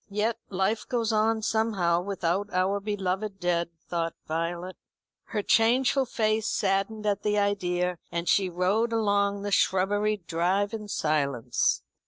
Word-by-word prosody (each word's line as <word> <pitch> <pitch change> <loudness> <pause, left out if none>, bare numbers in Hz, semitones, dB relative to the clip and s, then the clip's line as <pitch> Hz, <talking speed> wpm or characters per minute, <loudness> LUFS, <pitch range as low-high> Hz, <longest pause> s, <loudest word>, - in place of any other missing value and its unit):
"Yet 215 +3 -1
life 195 +3 -1
goes 235 -2 0
on 220 +1 +2
somehow 200 -7 +1
without 195 +1 -2
our 190 +2 +1
beloved 195 0 -3
dead," 170 -1 0 0.2
thought 165 -1 -2
Violet. 170 +3 -3 0.5
Her 210 -2 -3
changeful 255 +5 +3
face 215 -1 0
saddened 200 +2 0
at 205 -1 +1
the 210 0 0
idea, 180 -3 0
and 170 0 -3
she 195 -2 +3
rode 190 +7 +1
along 200 -2 +1
the 205 - -3
shrubberied 200 +1 +1
drive 185 +6 0
in 215 -2 -5
silence. 140 - 0
200 Hz, 135 wpm, -27 LUFS, 180-215 Hz, 0.5 s, changeful